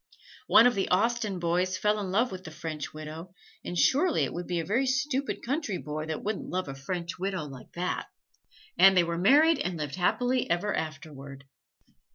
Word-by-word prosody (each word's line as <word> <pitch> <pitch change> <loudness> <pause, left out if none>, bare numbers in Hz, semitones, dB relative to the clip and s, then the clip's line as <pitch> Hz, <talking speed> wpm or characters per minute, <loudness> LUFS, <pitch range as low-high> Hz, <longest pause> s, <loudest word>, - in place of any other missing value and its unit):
One 230 - +7
of 245 - +5
the 195 -2 -1
Austen 215 +1 +1
boys 180 +2 0
fell 210 +2 +1
in 195 -2 -3
love 225 +7 +1
with 185 -1 -7
the 170 - -8
French 155 -1 -6
widow; 155 +4 -9 0.3
and 175 - -5
surely 305 - +3
it - - -2
would 175 +1 -5
be 175 -1 -1
a 165 - -3
very 240 +9 +1
stupid 270 +1 -1
country 265 - -2
boy 155 +1 -5
that 160 -1 -4
wouldn't 210 0 -3
love 185 -2 -2
a 135 - -5
French 170 +6 -5
widow 190 -3 -2
like 135 -3 -11
that! 180 +1 -3 0.7
And 195 -1 +7
they 175 - +6
were 170 0 -2
married 290 - +5
and 180 -1 -2
lived 150 0 -4
happily 245 +7 +1
ever 185 +4 0
afterward. 145 -3 -6
185 Hz, 195 wpm, -28 LUFS, 160-225 Hz, 0.7 s, One